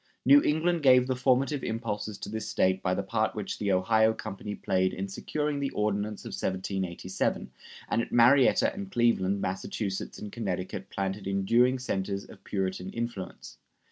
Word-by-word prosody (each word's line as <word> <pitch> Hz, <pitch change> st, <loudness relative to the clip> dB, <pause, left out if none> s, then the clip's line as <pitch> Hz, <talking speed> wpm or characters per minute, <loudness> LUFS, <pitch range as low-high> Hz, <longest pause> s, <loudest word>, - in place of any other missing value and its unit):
New 285 Hz, +1 st, +8 dB
England 165 Hz, -, +1 dB
gave 125 Hz, -3 st, +6 dB
the 130 Hz, 0 st, -1 dB
formative 130 Hz, +2 st, +1 dB
impulses 110 Hz, -2 st, -3 dB
to -, -, -7 dB
this 110 Hz, +1 st, -4 dB
State 95 Hz, 0 st, +2 dB
by 90 Hz, 0 st, 0 dB
the 100 Hz, -, -2 dB
part 110 Hz, +2 st, -1 dB
which 105 Hz, -2 st, -4 dB
the 100 Hz, -1 st, 0 dB
Ohio 110 Hz, +4 st, +3 dB
Company 105 Hz, -1 st, -6 dB
played 95 Hz, 0 st, 0 dB
in 95 Hz, +1 st, -3 dB
securing 150 Hz, +8 st, -2 dB
the 140 Hz, -1 st, -1 dB
Ordinance 105 Hz, 0 st, -1 dB
of -, -, -5 dB
1787, 95 Hz, -4 st, -2 dB, 0.4 s
and 115 Hz, -, +1 dB
at -, -, -6 dB
Marietta 125 Hz, +3 st, +5 dB
and 200 Hz, -1 st, -7 dB
Cleveland 100 Hz, -, +2 dB
Massachusetts 95 Hz, +1 st, -3 dB
and 105 Hz, -, -7 dB
Connecticut 95 Hz, -5 st, -4 dB
planted 95 Hz, 0 st, -3 dB
enduring 115 Hz, +7 st, +3 dB
centers 100 Hz, -5 st, -3 dB
of -, -, -15 dB
Puritan 95 Hz, -2 st, -3 dB
influence. 115 Hz, -5 st, -6 dB
105 Hz, 160 wpm, -28 LUFS, 95-125 Hz, 0.4 s, New